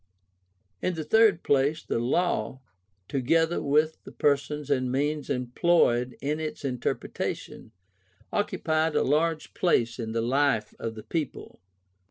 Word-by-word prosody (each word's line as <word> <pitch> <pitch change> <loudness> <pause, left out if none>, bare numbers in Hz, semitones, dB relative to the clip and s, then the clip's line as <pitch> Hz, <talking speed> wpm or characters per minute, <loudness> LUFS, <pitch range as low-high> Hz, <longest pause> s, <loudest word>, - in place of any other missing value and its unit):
In 185 - -1
the 160 - -3
third 220 -2 +4
place 140 +3 +2
the - - -1
Law, 130 -2 0 0.5
together 160 +5 +1
with 150 +2 +1
the - - -11
persons 145 0 0
and 130 -2 +1
means 145 +2 -1
employed 125 -1 +2
in 150 +3 -1
its 155 -2 -5
interpretation, 125 -3 -4 0.6
occupied 160 -6 0
a - - +3
large 155 +3 0
place 120 -9 +1
in 110 -1 -3
the 115 0 0
life 130 -3 +1
of 115 -1 -4
the 110 - -9
people. 155 0 -4
145 Hz, 130 wpm, -27 LUFS, 125-160 Hz, 0.6 s, third